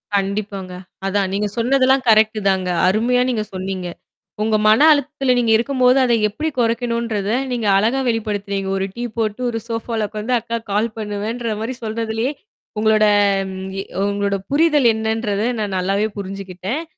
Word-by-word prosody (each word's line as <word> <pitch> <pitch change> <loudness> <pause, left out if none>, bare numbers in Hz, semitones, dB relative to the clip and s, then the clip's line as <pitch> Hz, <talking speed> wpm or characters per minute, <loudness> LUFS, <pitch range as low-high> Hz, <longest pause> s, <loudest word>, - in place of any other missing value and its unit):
கண்டிப்பாங்க. 195 -1 -2 0.3
அதான் 195 -1 0
நீங்க 205 +1 0
சொன்னதெல்லாம் 260 +2 +3
கரெக்ட்டு 215 0 +4
தாங்க. 185 -1 0 0.2
அருமையா 235 +6 +2
நீங்க 220 -4 -1
சொன்னீங்க. 185 -1 -4 0.6
உங்க 220 0 +1
மன 220 +8 +6
அழுத்தத்தில 285 -2 +1
நீங்க 230 -2 +2
இருக்கும்போது 255 +1 +2
அத 240 -2 +2 0.2
எப்படி 305 +10 -3
குறைக்கணுன்றத, 230 -3 -1 0.2
நீங்க 235 -4 -1
அழகா 230 +7 +2
வெளிப்படுத்துனீங்க. 205 -3 -2
ஒரு 190 - -1
டீ 240 - -4
போட்டு, 220 +1 -1
ஒரு 225 -1 -3
சோஃபால 225 -2 -2
உக்காந்து 215 +3 -3
அக்காக்கு 230 -1 -5
கால் 215 +3 +1
பண்ணுவேன்ற 215 +2 -3
மாரி 240 +4 -3
சொல்றதிலேயே, 225 +3 -2 0.5
உங்களோட 215 0 +4 0.5
ம் 190 0 -6
எ - - -5 0.3
உங்களோட 200 0 -1
புரிதல் 295 -4 +4
என்னன்றத 220 -1 -1 0.2
நான் 205 -2 -2
நல்லாவே 195 +4 0
புரிஞ்சுக்கிட்டேன். 195 - -5
220 Hz, 140 wpm, -19 LUFS, 200-240 Hz, 0.6 s, மன